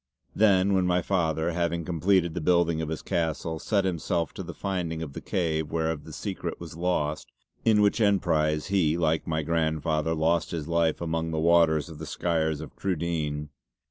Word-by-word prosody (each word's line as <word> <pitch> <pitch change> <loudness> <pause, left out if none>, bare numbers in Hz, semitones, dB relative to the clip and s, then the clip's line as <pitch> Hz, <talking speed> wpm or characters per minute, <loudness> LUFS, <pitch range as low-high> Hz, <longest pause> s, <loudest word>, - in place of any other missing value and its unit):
Then 100 -2 +4
when 95 -1 +2
my 90 -1 +2
father, 80 -3 0
having 85 -1 -1
completed 90 0 +2
the 90 - -3
building 85 -1 +2
of 80 - -3
his 80 - -4
castle, 80 -1 -2
set 100 +1 +1
himself 85 -1 -1
to - - -6
the 85 -3 -7
finding 85 -5 -3
of 70 -4 -7
the - - -7
cave 80 -4 -1
whereof 80 -2 -1
the - - -10
secret - - -5
was - - -9
lost, 80 -3 -1 0.3
in 105 -2 +5
which 105 +3 +2
emprise 80 -6 +2
he, 85 -5 +2
like 80 -2 0
my 80 -1 -1
grandfather 80 0 0
lost 80 +1 +1
his 80 -3 -4
life 85 -1 +1
amongst 80 -1 -2
the 80 - 0
waters 80 -1 +4
of 80 -3 -10
the 80 - -6
Skyres 80 +1 -1
of 80 - -10
Crudene. 80 -5 -2
80 Hz, 180 wpm, -27 LUFS, 80-90 Hz, 0.3 s, in